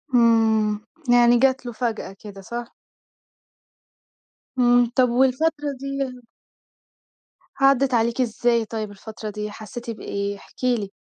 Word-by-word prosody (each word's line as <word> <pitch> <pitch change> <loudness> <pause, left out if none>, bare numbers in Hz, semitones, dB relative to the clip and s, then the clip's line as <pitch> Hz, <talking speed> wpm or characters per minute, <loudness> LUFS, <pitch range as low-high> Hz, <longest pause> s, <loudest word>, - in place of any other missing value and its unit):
إمم، 220 -3 +3 0.3
يعني 240 0 +6
جات 265 -1 +2
له 240 - -4
فجأة 220 -4 -3
كده، 200 -2 -10
صح؟ 235 +4 -7 1.8
امم، 245 -1 +5 0.2
طب 255 -2 +5
والفترة 290 +3 +2
دي 275 - -6 1.7
عدّت 275 -1 +3
عليكِ 235 +2 +1
إزاي 235 -1 +1
طيب 215 -1 -5
الفترة 215 +2 -8
دي؟ 210 0 -5
حسيتِ 235 +3 -8
بإيه؟ 200 -2 -4
احكِ - - -17
لي. 235 -6 +1
235 Hz, 115 wpm, -23 LUFS, 215-250 Hz, 1.8 s, يعني